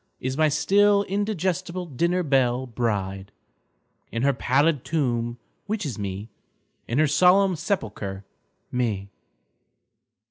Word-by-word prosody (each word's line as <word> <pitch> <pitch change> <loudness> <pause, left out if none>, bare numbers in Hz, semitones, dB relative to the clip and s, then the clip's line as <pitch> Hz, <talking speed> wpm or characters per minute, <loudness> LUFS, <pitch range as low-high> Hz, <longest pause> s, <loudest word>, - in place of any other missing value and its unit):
Is 130 +1 -3
n^y 155 0 +3
still 200 +6 +4
indigestible 185 -3 -2
dinner 170 +5 0
belle 130 -3 +2
bride, 100 -5 -2 0.8
In 115 +2 -2
her 140 0 +4
pallid 140 +3 +2
tomb, 120 -6 -1 0.3
which 210 -2 -2
is 125 -6 -4
Me, 100 +1 -4 0.6
In 120 - -1
her 155 - +5
solemn 180 +5 +4
sepulcher, 105 - -3 0.5
Me. 105 -6 -2
140 Hz, 110 wpm, -25 LUFS, 115-180 Hz, 0.8 s, her